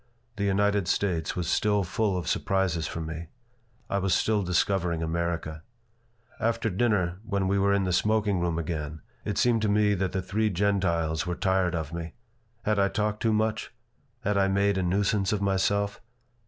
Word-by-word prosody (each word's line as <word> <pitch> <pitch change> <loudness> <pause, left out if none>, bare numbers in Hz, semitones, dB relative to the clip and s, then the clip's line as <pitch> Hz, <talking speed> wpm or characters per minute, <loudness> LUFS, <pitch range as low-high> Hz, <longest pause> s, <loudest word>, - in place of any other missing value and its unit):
The 100 - -1
United 100 -1 +2
States 85 -6 0
was 90 -2 -2
still 105 -1 +2
full 100 +1 0
of 85 - -4
surprises 95 -4 0
for 85 - -5
me. 80 +1 -5 0.6
I 100 - 0
was 95 -2 +2
still 110 +2 +2
discovering 90 -2 0
America 80 -1 -2 0.8
After 115 -1 0
dinner, 95 -4 +1
when 100 -3 -1
we 100 +1 +2
were 100 +1 +3
in 100 0 +2
the 90 -1 0
smoking 105 0 +2
room 85 -1 0
again, 80 -2 -4 0.2
it 105 - -2
seemed 120 -2 +3
to 105 - +1
me 105 0 +3
that 95 -1 -1
the 95 - -2
three 105 +4 0
Gentiles 90 -5 0
were 90 - -1
tired 95 -1 +1
of 80 -1 -4
me. 85 -1 -6 0.5
Had 105 -1 +1
I 100 - +4
talked 105 +1 -1
too 115 - +2
much? 110 0 0 0.5
Had 105 -2 +1
I 95 - +3
made 100 0 +2
a - - +1
nuisance 100 +2 +1
of 105 - 0
myself? 100 +1 0
95 Hz, 180 wpm, -27 LUFS, 85-105 Hz, 0.8 s, I